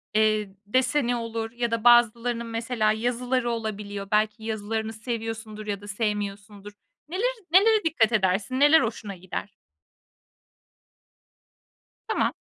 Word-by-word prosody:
eee, 215 -2 +2
deseni 255 +3 +1
olur 230 -1 -4
ya 235 0 -2
da 230 -1 -1
bazılarının, 240 0 +4
mesela, 230 -1 0
yazıları 245 +2 -1
olabiliyor. 205 -3 -4
Belki 215 +1 +1
yazılarını 220 0 -3
seviyorsundur 220 -1 -5
ya 200 -1 -3
da 205 - -11
sevmiyorsundur. 205 -1 -4 0.4
Neler 465 +9 -1 0.2
nelere 425 +4 +5
dikkat 255 -9 +2
edersin? 205 +4 +1
Neler 295 +1 +7
hoşuna 220 -3 -4
gider? 185 +3 -7 2.5
Tamam. - - +1
225 Hz, 110 wpm, -25 LUFS, 210-240 Hz, 2.5 s, Neler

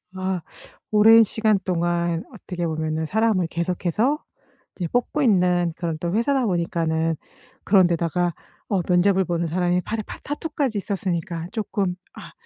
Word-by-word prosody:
아 185 -1 -2 0.5
오랜 225 +2 +7
시간 215 -1 +1
동안 170 -1 0
어떻게 180 -5 -5
보면은 155 0 -2
사람을 210 -2 +1
계속해서 180 - -1 0.5
이제 175 -3 -3
뽑고 245 - 0
있는 180 - +3
그런 165 -3 -3
또 170 0 -2
회사다 255 +3 +2
보니까는 165 -3 0 0.5
그런 190 -3 +5
데다가 170 0 0 0.4
어 195 -3 +1
면접을 190 +1 +3
보는 170 0 -1
사람이 180 +2 +1
팔에 220 +3 -3
파 - - -8
타투까지 290 -5 -2
있었으니까 175 -4 -3
쪼끔 205 -4 -2 0.2
'아 - - -11
180 Hz, 315 characters per minute, -23 LUFS, 170-215 Hz, 0.5 s, 오랜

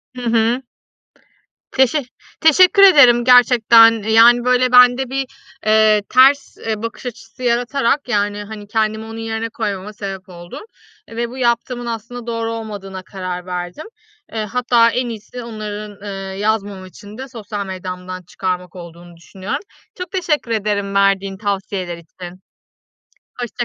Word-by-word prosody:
Hı 250 - -7
hı. 235 +1 +1 1.1
Teşe 265 +3 +2 0.4
teşekkür 365 +5 +5
ederim 255 -11 +7
gerçekten. 230 -2 +6
Yani, 230 +3 +5
böyle, 250 0 +2
bende 250 +1 +5
bir, 270 0 -1 0.4
eee, 215 -1 +4
ters, 270 +2 +4
eee, 220 -1 -4
bakış 230 +2 -6
açısı 225 0 -10
yaratarak 245 +3 0
yani, 205 -2 -1
hani, 210 0 -9
kendimi 220 0 -1
onun 225 0 -9
yerine 225 0 -3
koymama 210 -3 -5
sebep 195 -2 -7
oldun 175 - -10 0.5
ve 235 +1 -3
bu 255 - -9
yaptığımın 240 0 -1
aslında 235 +1 -6
doğru 230 -1 -3
olmadığına 205 -4 -7
karar 185 -1 -6
verdim. 180 - -6 0.5
Eee, 220 -1 -2
hatta 235 +1 +2
en 245 +1 -2
iyisi 230 +2 -8
onların, 210 -2 -7
eee, 195 -1 -6
yazmama 205 -2 -2
için 205 +4 -13
de 265 +1 -7
sosyal 210 -4 -6
medyamdan 185 -1 -7
çıkarmak 180 +1 -5
olduğunu 170 0 -12
düşünüyorum. 185 +3 -6 0.3
Çok 360 -2 -7
teşekkür 320 -9 -1
ederim 205 -2 -1
verdiğin 195 -1 +1
tavsiyeler 195 -3 -3
için. 175 +2 -12 1.0
Hoşça 240 0 -3
220 Hz, 135 wpm, -18 LUFS, 195-245 Hz, 1.1 s, ederim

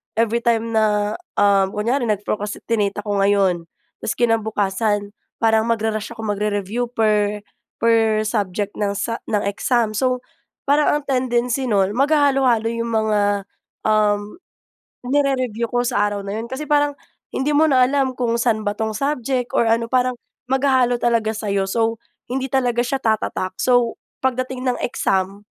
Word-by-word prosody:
every 230 +1 +1
time 230 -1 0
na, 210 -1 +1 0.2
ah, 200 -1 +4
kunyari 235 +6 -1
nag-procrastinate 205 0 -2
ako 205 -1 -1
ngayon, 195 -4 +2 0.3
tapos - - -3
kinabukasan 210 -2 0 0.3
parang 220 0 +3
magra-rush 220 -1 -1
ako 225 - -7
mag-review 210 +2 -1
per 210 -3 +1 0.3
per 225 -2 +3
subject 205 -2 -2
ng 200 -1 0
sa 230 +3 -2
ng 210 -2 +1
exam. 220 +2 +1
So, 255 +2 0 0.4
parang 290 +2 +3
ang - - -14
tendency 250 -1 0
no’n, 200 -1 +2
maghahalo-halo 270 -4 +3
‘yong 230 0 -3
mga, 220 -1 +1 0.7
um, 210 -1 +1 0.7
nire-review 255 -5 +1
ko 245 - +2
sa 240 -4 +1
araw 205 - -3
na 200 +2 -4
‘yon, 225 - -4
kasi 265 +4 -6
parang 290 0 +3 0.4
hindi 270 +3 0
mo 300 +2 +4
na 260 -4 +4
alam 265 0 +1
kung 235 -2 0
saan 230 -2 +1
ba 205 -1 -2
‘tong 220 -1 -2
subject 255 -1 -1
or - - +4
ano, 230 +1 +1
parang 255 0 +2 0.3
maghahalo 260 -2 +2
talaga 230 -2 +1
sa’yo. 200 -3 -1
So, 225 +2 0 0.3
hindi 265 +1 -1
talaga 245 -2 +1
siya 265 +2 -2
tatatak. 210 -4 -1
So, 245 -2 +2 0.3
pagdating 255 0 -1
ng 250 - 0
exam, 195 -3 -1
225 Hz, 145 wpm, -21 LUFS, 210-250 Hz, 0.7 s, ah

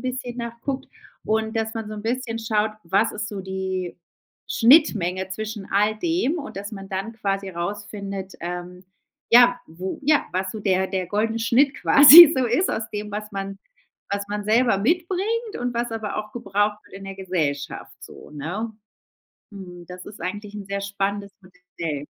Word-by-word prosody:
bisschen 255 -1 -5
nach 235 0 -5
guckt 270 -1 -3 0.4
und 220 +1 0
dass 225 0 -2
man 225 -1 -4
so 215 - -7
'n 210 - -6
bisschen 230 0 -2
schaut, 220 -1 0
was 200 +6 +2
ist 210 0 -4
so 205 -2 -5
die 190 -2 -4 0.5
Schnittmenge 205 - +4
zwischen 215 +1 -5
all 210 +2 +2
dem 335 0 0
und 290 -9 -8
dass 200 +2 -6
man 195 -2 -8
dann 195 +4 -4
quasi 195 -3 -3
rausfindet, 195 +2 -5
ähm, 180 +1 -6 0.5
ja, 245 +1 +6
wo 180 +4 -6
ja, 295 +1 +3
was 185 +1 -1
so 220 - -6
der 190 -2 +1
der 185 -1 -3
goldene 220 +4 -1
Schnitt 260 +5 +3
quasi 310 +3 +10
so 260 -1 +1
ist, 250 +11 +1
aus 220 0 -3
dem, 210 0 -4
was 210 +1 -5
man 195 0 -5 0.5
was 200 0 -3
man 205 0 -3
selber 225 0 +3
mitbringt 375 - -1
und 245 0 -2
was 235 0 -1
aber 220 -2 -4
auch 210 0 -4
gebraucht 210 -2 -1
wird - - -17
in 195 0 -9
der 195 0 -7
Gesellschaft 160 -7 -3
so, - - -12
ne? 175 +10 -4 0.8
Mhm, 180 -4 -11
das 180 0 -10
ist 205 - -11
eigentlich 205 +3 -5
'n 205 -1 -7
sehr 200 +1 -3
spannendes 200 0 -3
Modell. 180 -5 -7
205 Hz, 175 wpm, -23 LUFS, 190-230 Hz, 0.8 s, quasi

